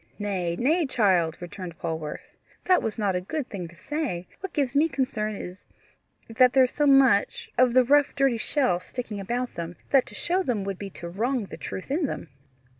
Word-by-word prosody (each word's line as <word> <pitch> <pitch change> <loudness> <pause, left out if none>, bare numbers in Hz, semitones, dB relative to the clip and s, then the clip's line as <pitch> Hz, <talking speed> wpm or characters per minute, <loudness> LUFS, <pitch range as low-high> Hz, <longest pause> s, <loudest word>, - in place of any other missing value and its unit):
"Nay, 185 -5 -2
nay, 305 - +2
child," 185 -10 +2
returned 175 -1 -8
Polwarth, 160 -2 -5 0.3
"that 365 -1 +4
was 220 0 -3
not 200 -4 0
a 180 - 0
good 290 +8 -4
thing 180 -4 -5
to 170 - -16
say. 250 - -3
What 385 -2 -6
gives 275 -5 0
me 300 +3 +3
concern 215 -7 -1
is, 180 -1 -9 0.6
that 250 +2 +4
there 265 - +6
is 250 - +1
so 295 -1 +1
much 270 -6 +4
of 250 -1 +4
the 255 0 +6
rough 285 +3 +3
dirty 270 -4 +2
shell 255 -8 +1
sticking 220 +1 -6
about 240 +5 -2
them, 170 +1 -5 0.2
that 270 -2 +4
to 210 - -11
show 360 - 0
them 240 - -1
would 195 -1 -4
be 200 - -5
to 170 0 -8
wrong 230 +6 -1
the - - -9
truth 190 - -7
in 300 +1 +1
them." 170 - -6
225 Hz, 200 wpm, -26 LUFS, 185-275 Hz, 0.6 s, there